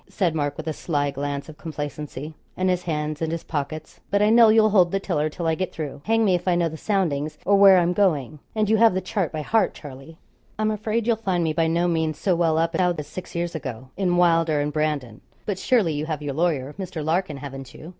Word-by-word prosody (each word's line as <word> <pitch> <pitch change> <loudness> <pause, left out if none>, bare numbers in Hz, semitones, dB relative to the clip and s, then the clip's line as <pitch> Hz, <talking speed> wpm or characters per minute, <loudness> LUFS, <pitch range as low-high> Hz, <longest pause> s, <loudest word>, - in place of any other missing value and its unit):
said 180 -5 0
Mark 145 -2 -2
with 160 - -6
a 160 - -2
sly 145 -3 -1
glance 140 0 -4
of 155 -2 -12
complacency, 150 -1 -6 0.2
and 185 0 +2
his 180 -1 0
hands 150 -2 -2
in 160 - 0
his 165 0 -4
pockets. 155 +1 -5
'But 200 +1 +2
I 210 - +4
know 230 -1 +7
you'll 215 -1 +5
hold 180 -4 +4
the 195 - 0
tiller 155 -6 -1
till 170 +2 -6
I 160 - +2
get 185 +3 -2
through; 145 -3 -6
hang 225 0 +2
me 190 - +3
if 180 +1 -1
I 180 - +3
know 170 -1 +1
the 160 - -8
soundings, 160 -6 -1
or 200 - +4
where 195 -1 +8
I'm 175 0 +2
going; 155 -7 +1 0.2
and 215 -1 +1
you 220 +1 +3
have 225 -3 +5
the - - +2
chart 190 -6 -2
by 155 -1 -4
heart, 225 +7 +1
Charlie.' 145 +2 -11 0.4
'I'm 215 0 +1
afraid 215 +1 -1
you'll 230 -1 +2
find 190 -5 -1
me 160 -1 0
by 165 +1 +1
no 170 +2 +1
means 160 -3 0
so 180 +3 +1
well 165 -2 +2
up 165 +1 +1
now 180 +1 +2
as 150 - -4
six 185 +3 -9
years 170 0 -2
ago 130 -5 -6
in 180 -2 +1
"Wylder 165 -3 +3
and 145 0 -1
Brandon;" 150 -7 -2 0.2
but 200 -3 -3
surely 210 -11 +2
you 150 +1 -3
have 155 -2 -3
your 145 -1 -3
lawyer, 150 -3 0
Mr. 180 -5 -5
Larkin, 160 -2 0
haven't 135 -1 -8
you?' 160 - -10
165 Hz, 245 wpm, -23 LUFS, 150-185 Hz, 0.4 s, where